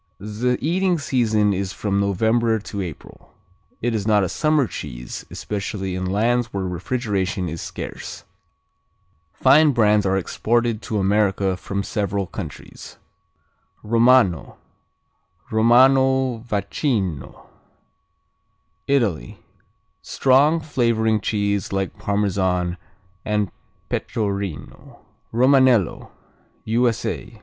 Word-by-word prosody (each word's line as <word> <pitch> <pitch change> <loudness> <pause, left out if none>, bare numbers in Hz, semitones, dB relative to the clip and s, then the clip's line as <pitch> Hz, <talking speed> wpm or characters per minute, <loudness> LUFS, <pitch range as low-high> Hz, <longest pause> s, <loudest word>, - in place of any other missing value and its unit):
The 110 +5 -1
eating 180 +4 +1
season 110 -8 +1
is 95 0 -3
from 100 -2 -1
November 110 +4 +1
to 100 -1 -6
April. 85 -6 -10 0.5
It 120 0 0
is 105 -2 -2
not 105 -2 +4
a 95 - -1
summer 155 -3 +2
cheese, - - -7
especially 100 -2 -4
in 95 0 -3
lands 115 +5 +1
where 100 -4 -4
refrigeration 95 0 -2
is 80 +1 -5
scarce. - - -7 1.1
Fine 140 +7 +4
brands 105 -3 +3
are 95 +1 +2
exported 115 +4 0
to 110 - -3
America 100 -1 +1
from 100 +2 -4
several 100 -2 -2
countries. - - -9 0.9
Romano, 115 - +3 0.9
Romano 130 +2 +4
Vacchino 100 - -2 1.4
Italy 110 - 0 0.6
Strong: 145 +5 +3
flavoring 115 -7 +1
cheese 100 -2 -1
like 95 +1 -3
Parmesan 95 -4 0 0.5
and 105 -2 -1 0.4
Pecorino. 100 - -4 0.3
Romanello 130 - +3 0.6
_U.S.A. 115 +1 -1
105 Hz, 95 wpm, -22 LUFS, 95-120 Hz, 1.4 s, not